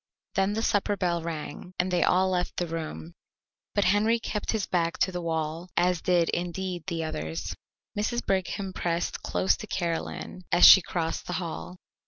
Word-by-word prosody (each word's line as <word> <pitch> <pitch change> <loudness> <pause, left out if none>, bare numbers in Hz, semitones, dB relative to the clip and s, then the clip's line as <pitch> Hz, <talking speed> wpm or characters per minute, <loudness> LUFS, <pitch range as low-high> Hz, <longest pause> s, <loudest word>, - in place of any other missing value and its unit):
Then 195 +1 +1
the 220 +1 -1
supper 205 -2 +1
bell 175 -3 0
rang, 165 +2 -6
and 180 +1 0
they 175 -1 +2
all 185 +1 +3
left 180 -1 -1
the 175 - 0
room, 155 - -5 0.6
but 205 - +3
Henry 210 +5 +3
kept 210 -2 -4
his 220 -3 -1
back 170 -1 0
to 185 - +2
the 180 -1 -4
wall, 165 +1 -2
as 180 -2 +2
did, 175 -2 +2
indeed, 180 0 -3
the 165 -3 -2
others. 80 - -4 0.4
Mrs. 230 +3 -1
Brigham 190 0 -1
pressed 170 -1 -2
close 190 - +1
to 215 - -8
Caroline 170 0 -3
as 175 - +7
she 190 - +11
crossed 165 -1 -3
the 180 - -3
hall. 175 +1 -5
180 Hz, 175 wpm, -27 LUFS, 165-190 Hz, 0.6 s, she